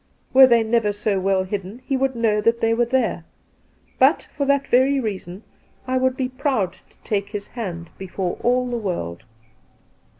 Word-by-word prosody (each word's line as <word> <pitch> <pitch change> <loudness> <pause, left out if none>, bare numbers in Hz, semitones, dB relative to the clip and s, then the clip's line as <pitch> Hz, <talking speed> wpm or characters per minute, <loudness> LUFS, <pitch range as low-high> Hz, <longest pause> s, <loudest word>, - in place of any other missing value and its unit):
Were 265 0 +9
they 235 -2 +4
never 220 -1 +1
so 205 -1 -1
weU 190 0 +1
hidden, 200 +5 -6
he 275 - -1
would 265 0 0
know 220 -2 +1
that 230 +2 +2
they 225 0 +2
were 235 +1 +1
there. 240 -8 0 0.8
But, - - +4
for 285 - -2
that 280 0 +2
very 265 +3 +3
reason, 195 -4 -5 0.4
I 255 0 0
would 260 0 +1
be 255 -2 -1
proud 255 -8 -1
to - - -21
take 200 -1 -2
his 205 -1 -6
hand 175 -8 -6
before 190 -1 -3
ajl 250 +1 +1
the 240 - -1
world.' 170 - -4
225 Hz, 175 wpm, -22 LUFS, 195-255 Hz, 0.8 s, Were